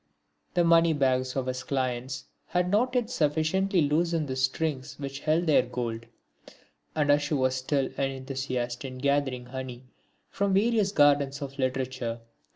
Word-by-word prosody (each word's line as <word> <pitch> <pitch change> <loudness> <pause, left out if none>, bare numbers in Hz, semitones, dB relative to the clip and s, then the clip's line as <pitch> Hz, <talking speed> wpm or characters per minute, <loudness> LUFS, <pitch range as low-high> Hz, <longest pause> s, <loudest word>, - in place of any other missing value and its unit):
The 175 - +4
money 165 -1 +5
bags 130 -3 +1
of 135 -2 -1
his 130 0 -3
clients 130 -1 -2 0.2
had 180 0 0
not 250 +5 +2
yet 245 -3 0
sufficiently 165 +5 +1
loosened 160 +1 +1
the 130 - -3
strings 135 0 -1
which 140 -1 -5
held 160 +4 +1
their 155 -5 +5
gold, 120 -2 -4 0.9
and 145 -2 +3
Ashu 145 +1 +2
was 130 -1 +2
still 130 +1 0
an 135 - +1
enthusiast 130 -2 -4
in 130 -1 -6
gathering 135 -2 0
honey 130 -1 -7 0.5
from 200 -1 +1
various 215 -1 +2
gardens 145 -4 +3
of 140 0 -8
literature. 130 -3 -2
140 Hz, 150 wpm, -28 LUFS, 130-160 Hz, 0.9 s, money